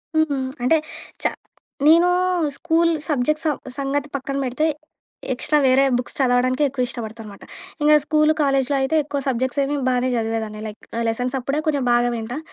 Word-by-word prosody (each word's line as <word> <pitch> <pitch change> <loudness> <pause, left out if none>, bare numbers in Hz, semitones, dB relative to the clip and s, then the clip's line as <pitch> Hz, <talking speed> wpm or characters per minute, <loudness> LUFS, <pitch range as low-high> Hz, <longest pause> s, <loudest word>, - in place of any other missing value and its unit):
హుహు. 315 -3 +2 0.3
అంటే 285 +6 +4 0.5
చా - - +3 0.6
నేను 335 +3 +6 0.5
స్కూల్ 335 0 +2 0.2
సబ్జెక్ట్స్ 305 +2 0
స - - +4 0.3
సంగతి 280 +1 -2
పక్కన 275 0 -4
బెడితే 260 +4 -1 0.7
ఎక్స్‌ట్రా 295 +4 0
వేరే 260 +1 +5
బుక్స్ 245 - -5
చదవడానికే 255 +1 +2
ఎక్కువ 255 -2 -1
ఇష్టబడతానుమాట. 220 -4 -8 0.4
ఇంగ 300 +1 +5
స్కూల్, 305 0 +3
కాలేజీలో 275 -1 +1
అయితే 265 +4 0
ఎక్కువ 290 -1 -3
సబ్జెక్ట్సేమి 265 +3 0
బానే 250 0 +1
చదివేదాన్ని. 220 -2 -3
లైక్ 210 0 -9 0.3
లెసన్సప్పుడే 250 +4 -1
కొంచెం 285 -3 +1
బాగా 240 0 +3
వింటా. 235 +4 -5
265 Hz, 140 wpm, -21 LUFS, 245-295 Hz, 0.7 s, నేను